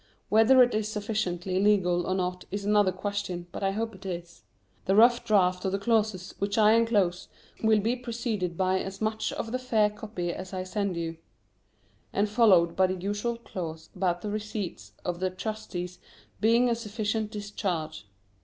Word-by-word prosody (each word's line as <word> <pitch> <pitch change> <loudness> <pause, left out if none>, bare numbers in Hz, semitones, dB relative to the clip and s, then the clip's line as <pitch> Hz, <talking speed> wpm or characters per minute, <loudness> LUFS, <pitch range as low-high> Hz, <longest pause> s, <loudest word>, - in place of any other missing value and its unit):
Whether 225 +4 +7
it 245 - +1
is 215 0 0
sufficiently 195 -4 -1
legal 180 -4 +3
or 185 - 0
not 180 -1 -2
is 200 +1 -4
another 205 -2 +4
question, 185 -2 -4
but - - -6
I 195 - +2
hope 225 +3 -2
it 190 0 -13
is. 175 -2 -6 0.4
The 195 - +2
rough 235 +3 +6
draft 185 -5 +2
of 190 - 0
the - - +2
clauses 205 -3 0
which 200 +1 -1
I 215 0 +6
enclose 205 -6 +2 0.3
will 220 -1 +4
be 230 +4 +1
preceded 230 -8 -3
by 185 0 +2
as 195 0 -6
much 220 0 -1
of 225 - -4
the 255 - -1
fair 220 -5 +2
copy 205 -5 -4
as 185 +1 -8
I 185 - -2
send 190 -1 -2
you, 165 -1 -3 0.9
and 205 +2 +1
followed 195 -6 +4
by 190 0 +4
the 185 - -2
usual 205 +5 -2
clause 165 -8 -7
about 180 -2 0
the 210 - -3
receipts 205 - -5
of 175 -1 -2
the 185 0 0
trustees 185 -3 -5 0.4
being 230 +3 +4
a 240 - +2
sufficient 220 -1 -2
discharge. 190 - -4
200 Hz, 175 wpm, -28 LUFS, 180-220 Hz, 0.9 s, Whether